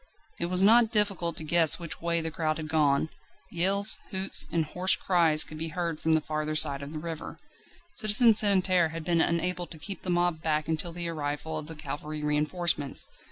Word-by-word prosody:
It 170 - -2
was 180 +1 +3
not 225 +2 +5
difficult 200 -6 -1
to - - -7
guess 165 0 +4
which 170 -2 -8
way 170 0 -1
the 160 0 -5
crowd 155 -1 -2
had 155 -1 -6
gone; 150 -1 +1 0.4
yells, 195 +4 +1
hoots, 190 0 +1
and 165 -2 0
hoarse 180 +5 +2
cries 165 -4 +3
could 155 - -10
be 165 - -3
heard 165 -1 -4
from 160 0 +1
the 160 - +1
farther 155 0 -4
side 140 -2 +3
of 140 +1 -8
the 155 - -6
river. 165 0 -7 0.6
Citizen 225 +2 +5
Santerne 185 -5 +3
had 165 0 -7
been 170 0 +1
unable 175 +1 -1
to 165 - -10
keep 170 +5 -7
the 185 - -6
mob 175 -2 0
back 155 -2 -1
until 160 +2 -1
the 170 0 -5
arrival 155 0 -4
of 155 -1 -6
the 160 - -7
cavalry 150 0 -7
reinforcements. 150 0 -1
165 Hz, 200 wpm, -27 LUFS, 155-180 Hz, 0.6 s, not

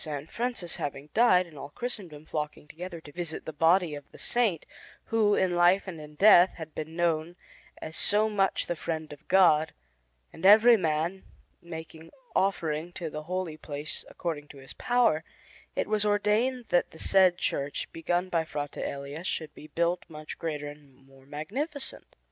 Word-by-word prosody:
Francis 235 -8 -2
having 145 +1 -5
died, 185 -6 +5
and 155 -5 -13
all 140 - -7
Christendom 175 -7 -6
flocking 150 -1 -4
together 170 +2 -7
to 145 - -12
visit 170 -1 -5
the 160 - -5
body 165 +2 +3
of 145 -1 -9
the - - -14
Saint, 220 -10 +1 0.5
who, 210 -2 +4
in 185 -1 +2
life 175 +3 +4
and 165 -4 -6
in 150 0 -11
death, 185 0 +7
had 160 -2 -8
been 155 +1 -6
known 170 0 0 0.4
as 160 - -7
so 210 +1 +3
much 200 -3 +1
the 175 - -2
friend 155 -2 -4
of 145 - -16
God, 160 -4 +4 0.6
and - - -12
every 220 +5 +8
man 165 0 -1 0.4
making 160 -1 -9 0.3
offering 170 -4 0
to 165 -4 -5
the 150 - -5
holy 180 -3 -3
place 145 0 -5
according 155 -4 -4
to 145 - -13
his 135 -1 -11
power, 240 -11 +2 0.5
it - - 0
was 215 -1 0
ordained 215 +5 +1
that 175 - +3
the - - -14
said 185 -2 +4
church 140 -4 -2
begun 175 +2 -1
by 165 -3 +1
Frate 145 -2 -5
Elia 140 +3 -5
should 160 -4 -3
be 155 - -12
built 170 +3 0
much 155 -1 -8
greater 150 -3 -3
and 145 -2 -12
more 135 0 -21
magnificent. 265 - -5
165 Hz, 170 wpm, -28 LUFS, 150-190 Hz, 0.6 s, every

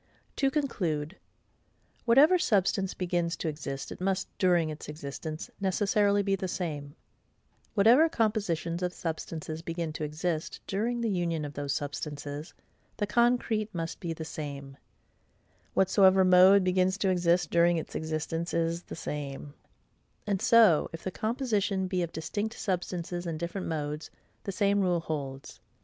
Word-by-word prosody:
To 275 - +3
conclude: 185 - -2 0.9
Whatever 285 +10 +6
substance 195 - +1
begins 175 -2 -1
to - - -4
exist, 140 -3 -5
it - - -8
must, 190 0 -1
during 175 -4 +3
its 150 - -8
existence, 155 +1 -6
necessarily 200 +1 +2
be 195 0 +1
the 190 -1 -3
same: 150 -5 -4 0.8
whatever 240 +10 +6
compositions 200 - -1
of 180 0 -1
substances 160 -1 -5
begin 165 -1 -4
to 155 - -4
exist, 155 +2 -3
during 235 +5 -1
the 230 - 0
union 170 -4 -1
of 145 - -7
those 145 -1 -2
substances, 145 +1 -5 0.5
the 205 - 0
concrete 225 -2 +1
must 165 -1 -4
be 170 -4 -4
the 160 0 -5
same: 140 -3 -6 1.0
whatsoever 190 0 +5
mode 185 +2 +7
begins 185 +1 +2
to 200 -2 +1
exist, 175 -2 +2
during 170 0 +4
its 160 - -5
existence 160 +2 -3
it 170 - +3
is 165 +1 -1
the - - -9
same: 145 -1 -5 0.7
and 200 -3 -1
so 225 -10 +5
if 165 - -7
the 185 - -3
composition 215 -4 0
be 185 -1 -1
of 170 -1 -2
distinct 205 +8 -3
substances 175 -2 -3
and 160 -2 -3
different 170 +3 -4
modes, 150 -1 -3 0.4
the 195 - -2
same 200 0 +2
rule 175 -3 +1
holds. 140 -4 -5
175 Hz, 145 wpm, -29 LUFS, 155-200 Hz, 1.0 s, mode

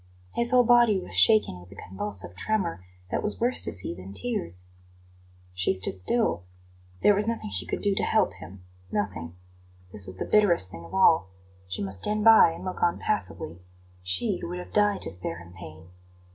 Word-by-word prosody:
His 235 0 +3
whole 250 -1 +5
body 235 -4 +5
was - - -10
shaken 215 - +4
with 90 +1 -16
a - - -12
convulsive 95 -2 -5
tremor 175 - -1 0.3
that - - -1
was 210 - -3
worse 245 +2 +1
to - - -2
see 95 -2 -2
than 90 +3 -10
tears. 90 -4 -3 0.9
She 90 +1 +1
stood 95 0 0
still. 100 - 0 0.6
There 205 - +6
was 205 +2 +2
nothing 230 - -3
she 90 -2 -2
could - - -3
do 205 -1 +3
to - - -1
help - - +1
him 90 +4 -12 0.3
nothing. 90 -5 -3 0.6
This 100 -2 -5
was 95 0 -9
the - - -3
bitterest 175 - +3
thing 85 -1 -10
of - - -9
all. 165 - +4 0.4
She 90 +2 -4
must 95 -1 -2
stand 210 - -1
by 225 -6 +7
and 165 - -9
look 185 - -5
on 175 - +2
passively 85 +3 -3 0.4
she 180 - -1
who - - -6
would 180 - -5
have 180 - -9
died 205 -1 +2
to - - 0
spare 85 -1 -4
him 90 0 -13
pain. 80 -2 -12
100 Hz, 195 wpm, -26 LUFS, -, 0.9 s, by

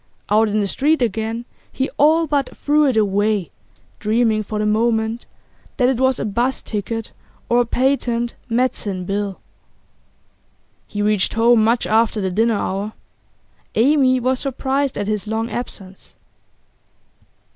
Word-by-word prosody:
Out 215 +1 +4
in 210 +1 +1
the 200 - 0
street 300 +9 +1
again, 225 0 -2 0.3
he 265 - -1
all 320 +3 +5
but 285 -3 -1
threw 295 0 +3
it 255 -4 +1
away, 205 -3 +1 0.5
dreaming 220 - +1
for 215 0 -5
the 210 - 0
moment 220 +1 0 0.5
that 250 -1 +3
it 260 -2 0
was 260 -1 +2
a - - -3
'bus 240 +5 -1
ticket 225 +1 -4 0.4
or 240 +1 +4
a 240 - -1
patent 240 -2 0 0.2
medicine 225 -6 -1
bill. 200 0 -3 1.5
He 205 0 -3
reached 210 -2 +1
home 230 0 +4
much 230 +2 +2
after 220 0 +2
the 190 -2 -1
dinner 225 +4 +2
hour. 200 +2 -3 0.8
Amy 260 +1 +4
was 255 +1 0
surprised 270 0 -1
at 205 - -2
his 210 -1 -2
long 225 +2 -2
absence. 195 -6 -7
225 Hz, 140 wpm, -20 LUFS, 210-255 Hz, 1.5 s, all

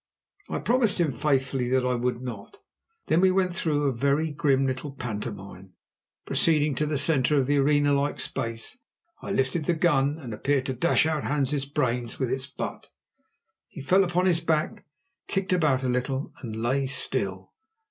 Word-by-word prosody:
I - - -2
promised 230 -5 +1
him 165 -4 +2
faithfully 135 -1 0
that 130 0 +2
I 125 - +1
would 125 0 -2
not. 125 - -8 0.5
Then 165 - +2
we 190 - +5
went 185 -1 +1
through 155 -4 0
a 140 - +2
very 140 +6 +1
grim 140 -3 +2
little 130 +2 -3
pantomime. 100 -6 -7 0.5
Proceeding 150 -3 +2
to 150 +4 -1
the 150 -1 -1
centre 145 -1 +3
of 135 - +3
the 145 +2 +1
arena 145 +1 +3
like 140 +1 0
space, 115 - -4 0.4
I - - -7
lifted 150 -2 0
the 175 - +1
gun, 150 -3 +2
and 125 -8 -7
appeared 135 +4 0
to 130 - -2
dash 155 +5 +2
out 155 -2 -1
Hans' 145 -1 0
brains 125 -5 -2
with 130 -3 -1
its 130 0 -2
butt. 135 - -6 0.8
He - - -11
fell 185 +8 +3
upon 180 0 0
his 175 -3 +3
back, 160 -2 -1 0.4
kicked 190 -1 -1
about 150 -7 +2
a - - 0
little, 130 +2 -2
and 115 -5 -6
lay 130 +5 0
still. 95 -7 -2
140 Hz, 175 wpm, -26 LUFS, 130-155 Hz, 0.8 s, we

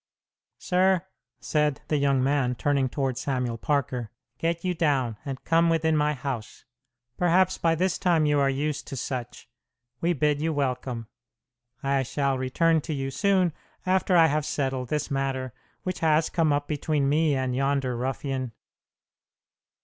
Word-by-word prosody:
"Sir," 185 -1 +2 0.3
said 150 -2 0
the 150 - +1
young 140 -2 +2
man, 135 -2 +1
turning 140 0 +1
toward 135 -2 -2
Samuel 125 -4 -2
Parker, 125 -6 -1 0.3
"get 165 0 -1
you 180 - +1
down, 135 -9 0
and 135 -2 -5
come 165 +1 +3
within 160 -1 +2
my 150 0 +2
house. 125 -5 -6 0.5
Perhaps 180 +1 +3
by 165 -1 +2
this 180 +2 0
time 175 -5 +3
you 150 -1 +3
are 140 -1 +3
used 145 +2 -2
to - - -5
such. 125 -2 -5 0.5
We 175 +1 +1
bid 150 -1 +1
you 160 +1 0
welcome. 125 -4 -2 0.8
I 135 0 +2
shall 140 +1 0
return 160 +5 +2
to 155 +1 -4
you 135 -1 -3
soon, 185 +2 +2 0.3
after 185 0 +3
I 165 - +7
have 155 -1 +1
settled 130 -3 -2
this 150 -2 -2
matter 135 -2 -2 0.3
which 185 -1 -3
has 155 0 +2
come 160 -3 +2
up 145 0 0
between 150 -1 0
me 150 +1 +2
and 130 -1 -1
yonder 135 -1 0
ruffian." 130 0 -3
145 Hz, 155 wpm, -26 LUFS, 130-160 Hz, 0.8 s, I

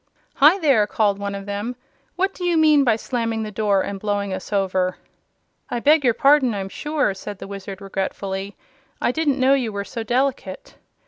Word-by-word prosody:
"Hi 300 +7 +6
there!" 275 - +3
called 205 -2 +1
one 200 0 -4
of 195 0 -7
them; 205 +5 -4 0.4
"what 385 +2 0
do 360 - -8
you 350 -2 +2
mean 305 -2 +5
by 235 -4 +3
slamming 230 -1 -2
the 215 - -6
door 200 -2 +1
and 200 -1 -5
blowing 205 -1 -2
us 185 +2 -7
over?" 185 -2 0 0.7
"I 240 - -2
beg 295 +4 +4
your 240 -3 +3
pardon, 275 -4 +4
I'm 195 -1 -4
sure," 295 -2 -1
said 200 +1 -8
the - - -8
Wizard, 195 0 -8
regretfully. 195 0 -4 0.4
"I - - +1
didn't 285 -1 0
know 260 +1 +4
you 250 -5 0
were 200 -1 -4
so 230 - -6
delicate." 245 -4 -2
215 Hz, 190 wpm, -22 LUFS, 200-275 Hz, 0.7 s, Hi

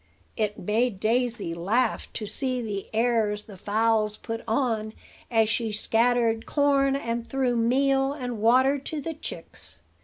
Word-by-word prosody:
It 210 -1 -1
made 215 +2 0
Daisy 235 -4 0
laugh 215 +8 0
to 215 - -4
see 255 +4 -1
the 210 -4 -4
airs 220 -2 +1
the 205 - -12
fowls 215 +2 +1
put 225 0 -5
on 225 -2 0 0.4
as 225 -2 +3
she 225 0 -1
scattered 230 +1 +1
corn, 280 -2 +2
and 235 -3 -3
threw 260 -2 0
meal 270 +3 +2
and 250 -6 -5
water 260 +5 +4
to 300 +3 -5
the 325 +3 -4
chicks. 80 - -9
230 Hz, 145 wpm, -26 LUFS, 215-255 Hz, 0.4 s, water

